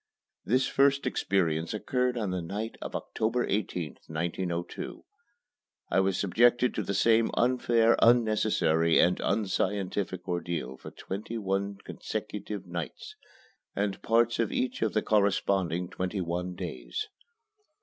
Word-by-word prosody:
This 130 +4 +2
first 140 0 +3
experience 85 -7 0
occurred 125 +3 0
on 105 -5 -1
the 90 -1 -2
night 105 +7 -4
of - - -6
October 115 +3 -1
18th, 90 -7 -2
1902. 85 +2 -4 0.9
I - - +4
was 95 -1 +2
subjected 120 +5 +3
to - - -1
the 100 0 -3
same 115 +2 +4
unfair, 120 -2 +3
unnecessary, 110 -8 +4
and 90 +1 +4
unscientific 95 -2 -1
ordeal 85 -5 -3
for - - -9
twenty 105 +4 -6
one 100 -1 -1
consecutive 105 -3 -5
nights 85 -5 -6 0.6
and 100 -1 -1
parts 115 +1 +2
of - - +1
each 255 -1 -1
of - - +1
the 110 - +1
corresponding 95 -4 +1
twenty 95 +2 -3
one 90 +1 -3
days. 435 - -5
100 Hz, 125 wpm, -29 LUFS, 90-115 Hz, 0.9 s, I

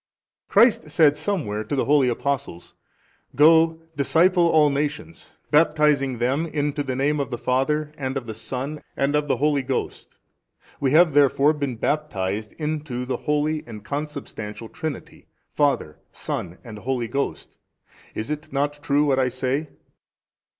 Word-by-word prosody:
A. - - -44
Christ 210 -7 +4
said 150 -1 +4
somewhere 140 - -2
to 145 - -3
the 135 - 0
holy 140 -3 +4
Apostles, 140 -8 -3 0.6
Go 160 +3 +5
disciple 170 +5 +3
all 150 -3 +4
nations, 150 +3 -4 0.2
baptizing 150 -4 +3
them 135 +8 0
into 150 -1 -2
the 130 -2 -3
name 145 +3 +1
of 140 -2 -2
the 120 - -4
Father 150 +5 0
and 135 -2 -3
of 130 - -5
the 110 - -6
Son 130 +7 -5 0.2
and 140 +2 +1
of 150 0 +1
the - - +1
Holy 145 -1 +2
Ghost. 130 0 -4 0.6
We 135 - +1
have 165 -1 +6
therefore 145 +1 +4
been 140 -4 -3
baptized 110 -7 -2
into 150 -5 -4
the 125 -1 -2
Holy 150 +1 -1
and 105 -3 -10
Consubstantial 140 -7 -6
Trinity, 160 -4 -7 0.3
Father 140 - 0
Son 85 +2 -4
and 110 -4 -9
Holy 125 0 -2
Ghost. 140 +5 -4 0.6
Is 110 +6 -4
it 150 +1 -5
not 145 +1 -1
true 145 -1 +2
what 135 -2 +2
I 130 - +2
say? 130 +4 -1
145 Hz, 150 wpm, -23 LUFS, 130-150 Hz, 0.6 s, have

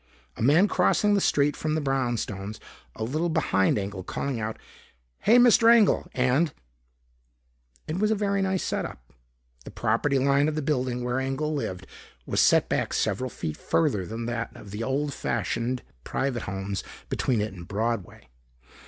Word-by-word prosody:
A - - -8
man 155 - +5
crossing 210 0 +2
the 200 - +3
street 145 -3 +2
from 155 0 -2
the - - +1
brownstones, 120 -7 -2 0.4
a - - -4
little 155 +9 -1
behind 95 - +2
Engel, 100 -1 -4
calling 130 +6 -3
out, 110 0 -3 0.6
"Hey, 225 +4 +5
Mr. 235 -1 +7
Engel," 230 -4 +4
and 130 +6 +2 1.4
It 160 +4 -2
was 215 +1 +2
a 220 - +2
very 200 -1 0
nice 190 -1 0
set - - -1
up. - - -10 0.5
The - - -9
property 135 +6 0
line 140 +2 +3
of 155 - -1
the 155 - -2
building 125 -4 -1
where 125 +1 -1
Engel 135 +3 -2
lived 95 -11 -4 0.4
was - - -1
set - - +4
back - - -1
several 130 0 0
feet 75 -9 -5
further 90 +4 +1
than 115 +1 -5
that 120 0 -3
of 100 - -11
the 105 +2 -5
old 140 +3 -1
fashioned 120 +2 -2 0.2
private 130 - -2
homes 95 0 -4 0.2
between 125 -4 0
it 105 -1 -2
and 85 -2 -10
Broadway. 110 - -3
130 Hz, 165 wpm, -26 LUFS, 110-155 Hz, 1.4 s, Mr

